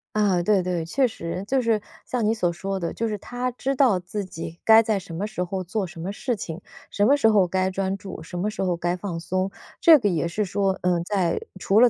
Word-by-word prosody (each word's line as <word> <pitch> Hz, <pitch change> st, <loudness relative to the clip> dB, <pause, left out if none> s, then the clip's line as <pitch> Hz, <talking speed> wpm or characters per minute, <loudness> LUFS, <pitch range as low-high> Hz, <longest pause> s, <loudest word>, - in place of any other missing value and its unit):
啊， 195 Hz, -5 st, +2 dB
对 200 Hz, 0 st, +3 dB
对， 175 Hz, -2 st, -2 dB
确 260 Hz, +10 st, +2 dB
实， 180 Hz, -4 st, -5 dB
就 270 Hz, +3 st, +2 dB
是 230 Hz, -4 st, +1 dB, 0.2 s
像 245 Hz, -2 st, -1 dB
你 215 Hz, +2 st, +2 dB
所 180 Hz, -6 st, +1 dB
说 195 Hz, +2 st, -3 dB
的， 170 Hz, -2 st, -3 dB
就 230 Hz, -, -1 dB
是 210 Hz, -1 st, -2 dB
他 245 Hz, +5 st, -3 dB
知 265 Hz, +2 st, -2 dB
道 250 Hz, -9 st, +4 dB
自 200 Hz, +4 st, -4 dB
己 165 Hz, -2 st, -8 dB
该 225 Hz, 0 st, +7 dB
在 215 Hz, -3 st, 0 dB
什 175 Hz, -3 st, -9 dB
么 190 Hz, +5 st, -2 dB
时 210 Hz, -4 st, -3 dB
候 185 Hz, +1 st, -3 dB
做 190 Hz, +1 st, -2 dB
什 170 Hz, -1 st, -11 dB
么 185 Hz, +4 st, -3 dB
事 245 Hz, +3 st, -2 dB
情。 175 Hz, -3 st, -6 dB, 0.3 s
什 205 Hz, +1 st, +2 dB
么 285 Hz, +3 st, +5 dB
时 250 Hz, -, +4 dB
候 200 Hz, -4 st, +4 dB
该 185 Hz, +1 st, 0 dB
专 190 Hz, +1 st, -1 dB
注、 190 Hz, -4 st, -8 dB
什 175 Hz, +2 st, -7 dB
么 205 Hz, +4 st, -1 dB
时 210 Hz, -, -5 dB
候 180 Hz, -2 st, 0 dB
该 175 Hz, +1 st, 0 dB
放 180 Hz, -2 st, -4 dB
松， 185 Hz, +3 st, -1 dB, 0.3 s
这 325 Hz, -2 st, +9 dB
个 235 Hz, -, 0 dB
也 170 Hz, -2 st, 0 dB
是 205 Hz, +5 st, -1 dB
说， 195 Hz, 0 st, 0 dB
嗯， 175 Hz, -2 st, +2 dB
在 180 Hz, -3 st, 0 dB, 0.2 s
除 195 Hz, +3 st, +3 dB
了 245 Hz, +1 st, +7 dB
195 Hz, 265 characters per minute, -24 LUFS, 175-215 Hz, 0.3 s, 这